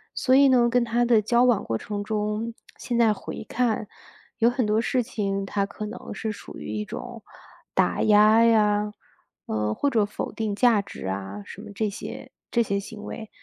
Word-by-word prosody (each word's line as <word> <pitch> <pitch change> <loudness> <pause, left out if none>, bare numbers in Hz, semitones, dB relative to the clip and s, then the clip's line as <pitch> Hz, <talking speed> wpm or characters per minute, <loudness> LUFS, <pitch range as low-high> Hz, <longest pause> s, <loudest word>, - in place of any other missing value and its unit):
所 255 - +3
以 280 +1 +7
呢， 245 -2 +4
跟 245 0 +3
他 235 +1 +1
的 235 -2 +5
交 235 +3 +3
往 235 -5 +3
过 115 - -2
程 205 -1 -4
中， 215 +2 -2 0.2
现 240 - -3
在 230 -2 +5
回 210 - -7
看， 225 -4 0 0.5
有 230 0 +4
很 250 -1 0
多 210 +1 +2
事 250 +2 +1
情， 195 -3 -2
他 200 0 0
可 200 +2 -7
能 220 - -8
是 220 - -3
属 205 - -10
于 75 +8 -6
一 105 0 -2
种 - - -8 0.5
打 - - +1
压 215 +2 +6
呀， 210 -2 +3 0.6
呃， 105 0 -1
或 285 - 0
者 225 -6 +2
否 205 - -5
定 220 -2 -2
价 230 -2 +4
值 200 - -9
啊 95 +1 -4
什 - - -10
么 - - -10
这 215 +1 0
些 200 - -8 0.2
这 235 - +3
些 200 -2 -1
行 210 +1 -9
为。 220 0 -7
215 Hz, 210 characters per minute, -25 LUFS, 205-235 Hz, 0.6 s, 以